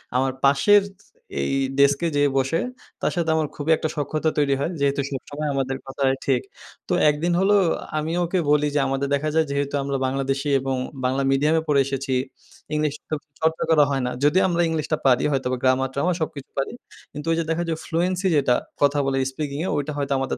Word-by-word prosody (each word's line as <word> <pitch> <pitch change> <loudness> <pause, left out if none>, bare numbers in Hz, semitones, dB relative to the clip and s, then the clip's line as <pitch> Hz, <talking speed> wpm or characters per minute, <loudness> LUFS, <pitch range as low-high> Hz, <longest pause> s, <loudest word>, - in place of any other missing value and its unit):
আমার 130 +1 +2
পাশের 170 +10 +5 0.2
স - - -28 0.3
এই 70 - -1 0.3
ডেস্কে 140 +4 +4
যেয়ে 145 0 +3
বসে 135 +5 +1 0.4
তার - - +1
সাথে 165 -2 0
আমার 155 -2 +1
খুবই 150 +2 -1
একটা 155 - -2
সখ্যতা 155 +2 0
তৈরি 140 -2 +3
হয়। 160 +5 -1
যেহেতু 140 0 +1
সবসসময় 145 +2 -4
আমাদের 135 0 -1
কথা 135 +1 -8
হয়, 135 - +2
ঠিক। 130 -3 +2 0.5
তো - - 0 0.2
১ 150 - +1
দিন 175 - +2
হল 195 - +2 0.5
আমি 155 +2 -2
ওকে 175 +2 -1
বলি 150 0 +4
যে, - - +3
আমাদের 135 +1 -1
দেখা 145 +2 0
যায় 160 0 +4
যেহেতু 140 0 -1
আমরা 140 0 -1
বাংলাদেশী 135 +2 -1
এবং 135 0 -2 0.3
বাংলা 130 +2 +1
মিডিয়ামে 150 +4 +2
পড়ে 145 -2 +3
এসেছি 135 0 -3 0.6
ইংলিশ 150 -1 0 0.2
চ - - -31 0.3
চর্চা 160 0 +1
করা 150 -2 +6
হয় 135 - 0
না। 125 - -1
যদিও 160 +6 +4
আমরা 175 0 +1
ইংলিশটা 155 -1 -1
পারি 130 -1 +4
হয়তোবা 130 -2 -1
গ্রামার-ট্রামার 130 +6 +1
সবকিছু 145 -3 -4
পারি 135 - -1 0.4
কিন্তু 150 +1 -7
ওই - - +3
যে, - - +1
দেখা 165 +1 0
যায় 160 -1 -1
ফ্লুয়েন্সি 180 +3 0
যেটা 135 -4 +3 0.3
কথা 145 0 +3
বলে 135 0 0
স্পিকিংয়ে 150 +4 -3
ওইটা 145 +1 -2
হয়তো 140 -1 -1
আমাদের 135 - -2
145 Hz, 195 wpm, -23 LUFS, 135-160 Hz, 0.6 s, করা